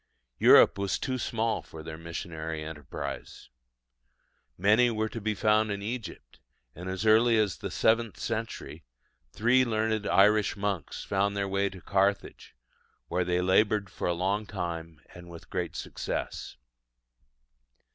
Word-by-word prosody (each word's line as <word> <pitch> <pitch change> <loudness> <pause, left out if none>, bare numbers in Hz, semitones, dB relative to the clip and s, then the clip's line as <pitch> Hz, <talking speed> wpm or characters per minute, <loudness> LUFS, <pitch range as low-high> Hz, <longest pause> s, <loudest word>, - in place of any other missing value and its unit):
Europe - - +7
was 100 -1 0
too 130 -2 -3
small 115 -1 -1
for 80 -1 -11
their 80 0 -7
missionary 80 -1 -5
enterprise. 75 -4 -7 1.1
Many 105 +6 +4
were 110 -1 -1
to 115 - -6
be 110 +1 -1
found 110 +1 +2
in 100 0 -4
Egypt; 110 -4 -6 0.3
and 90 +3 -7
as 95 +3 -3
early 115 +2 +5
as 105 -5 +1
the - - -4
seventh 115 -1 +1
century, 115 0 -5 0.5
three 120 - +3
learned 110 -2 0
Irish 105 +1 +4
monks 100 -7 -3
found 100 +1 0
their 100 -1 0
way 100 +1 0
to 95 -1 -12
Carthage, 100 +2 -1 0.5
where 90 - +1
they 90 0 0
laboured 100 +1 +2
for - - -3
a 90 - +2
long 100 +5 -1
time 85 -5 -5
and 85 0 -12
with 85 -1 -12
great - - -3
success. - - -5
100 Hz, 140 wpm, -28 LUFS, 90-110 Hz, 1.1 s, Europe